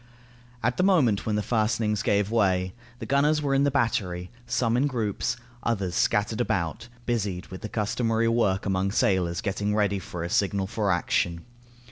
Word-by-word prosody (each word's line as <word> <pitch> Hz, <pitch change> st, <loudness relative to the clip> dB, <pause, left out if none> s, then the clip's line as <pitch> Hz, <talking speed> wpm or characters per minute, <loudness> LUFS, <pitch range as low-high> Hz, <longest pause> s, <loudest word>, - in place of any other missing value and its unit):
At 125 Hz, +2 st, +1 dB
the -, -, +2 dB
moment 140 Hz, -, +3 dB
when 105 Hz, -, +1 dB
the 105 Hz, -, 0 dB
fastenings 110 Hz, -2 st, 0 dB
gave 100 Hz, +1 st, +1 dB
way, 95 Hz, -5 st, +1 dB, 0.2 s
the 120 Hz, -, -6 dB
gunners 145 Hz, +4 st, +3 dB
were 140 Hz, -2 st, 0 dB
in 135 Hz, +1 st, +3 dB
the -, -, +3 dB
battery, 95 Hz, -9 st, -1 dB, 0.2 s
some 120 Hz, -1 st, +1 dB
in 135 Hz, +4 st, +3 dB
groups, 115 Hz, -2 st, -2 dB, 0.2 s
others 100 Hz, -6 st, -1 dB
scattered 105 Hz, +5 st, +1 dB
about, 100 Hz, +1 st, -2 dB, 0.2 s
busied 100 Hz, -7 st, -1 dB
with 95 Hz, -, -8 dB
the 110 Hz, -, -5 dB
customary 115 Hz, +1 st, 0 dB
work 115 Hz, -5 st, +1 dB
among 95 Hz, -1 st, 0 dB
sailors 95 Hz, -3 st, +1 dB
getting 105 Hz, 0 st, -1 dB
ready 100 Hz, -2 st, +1 dB
for 90 Hz, -2 st, -6 dB
a 85 Hz, -, -3 dB
signal 100 Hz, -1 st, +1 dB
for 105 Hz, -1 st, -1 dB
action. 85 Hz, -1 st, 0 dB
105 Hz, 170 wpm, -26 LUFS, 95-115 Hz, 0.2 s, moment